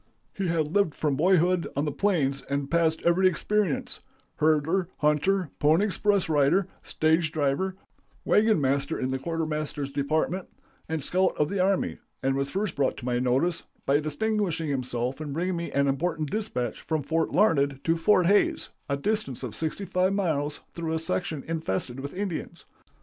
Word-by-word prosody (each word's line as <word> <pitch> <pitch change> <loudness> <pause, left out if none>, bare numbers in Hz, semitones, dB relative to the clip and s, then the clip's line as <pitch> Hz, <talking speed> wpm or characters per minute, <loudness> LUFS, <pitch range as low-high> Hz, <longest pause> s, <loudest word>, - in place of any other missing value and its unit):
He 195 -2 -2
had 160 -2 0
lived 200 -7 +2
from 150 -3 0
boyhood 180 +2 +3
on 140 +2 0
the 150 - -1
plains 140 -7 +1
and 140 0 -2
passed 165 -1 +2
every 175 +2 +4
experience 185 -1 0 0.4
herder, 160 +4 +2
hunter, 150 +3 +1
pony 160 +7 +4
express 205 -1 +1
rider, 155 +5 +3
stage 160 0 +1
driver, 160 +5 0 0.5
wagon 215 -3 +4
master 140 +2 0
in 130 0 -1
the 130 - -1
quartermaster's 155 -2 -3
department, 155 +6 -1 0.4
and 160 -3 -2
scout 185 +5 +1
of 150 0 +1
the 200 - -2
army, 190 +1 +1 0.2
and 135 0 +2
was 140 0 -1
first 195 +2 -2
brought 140 -2 0
to 120 - -8
my 120 -1 0
notice 130 +8 +1 0.2
by 140 +2 +3
distinguishing 165 +1 -1
himself 130 0 -2
in 145 -2 -4
bringing 180 +4 -1
me 170 0 -3
an 140 0 +2
important 155 +1 -1
dispatch 125 - -2
from 155 -2 -2
Fort 160 +3 0
Larned 140 -7 +2
to 165 - +2
Fort 180 +2 +3
Hays, 200 +3 +2 0.2
a 140 - 0
distance 205 - -1
of 120 -4 -4
sixty 160 +5 -3
five 185 +1 +1
miles, 150 -7 -1
through 165 -1 -3
a - - +1
section 160 -2 -2
infested 135 -6 -2
with 140 +4 -6
Indians. 180 -3 -4
160 Hz, 165 wpm, -27 LUFS, 140-185 Hz, 0.5 s, every